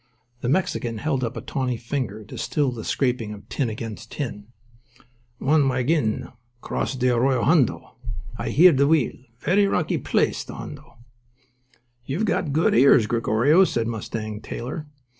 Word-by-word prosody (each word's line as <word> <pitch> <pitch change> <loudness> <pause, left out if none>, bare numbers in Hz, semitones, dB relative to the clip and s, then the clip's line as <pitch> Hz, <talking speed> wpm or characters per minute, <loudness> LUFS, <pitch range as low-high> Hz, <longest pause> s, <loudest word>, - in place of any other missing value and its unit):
The 120 - -2
Mexican 125 -7 0
held 135 +1 -1
up 120 +2 -3
a - - -4
tawny 130 -3 -2
finger 115 -3 -4
to 105 - -11
still 145 -4 0
the 115 -3 -6
scraping 120 -5 -1
of 100 - -12
tin 130 -5 -1
against 110 +1 -7
tin. 105 -8 -5 0.9
"One 145 +1 +3
waggeen," 130 -2 +1
said - - -8
he, - - -14 0.3
"cross 135 - -3
dthe 125 -1 +2
Arroyo 125 0 +2
Hondo. 145 -2 +2 0.4
Ah - - -3
hear 175 +3 +6
dthe 140 +1 +3
wheel. 155 -4 +3 0.2
Verree 200 +9 +2
rockee 180 -5 0
place, - - 0
dthe - - -9
Hondo." - - -10 1.1
"You've 145 - -1
got 180 -6 0
good 160 +4 +2
ears, 125 -2 +6
Gregorio," 120 - +3
said 115 -10 0
Mustang 110 -1 -4
Taylor. 145 +6 -6
125 Hz, 160 wpm, -24 LUFS, 115-145 Hz, 1.1 s, hear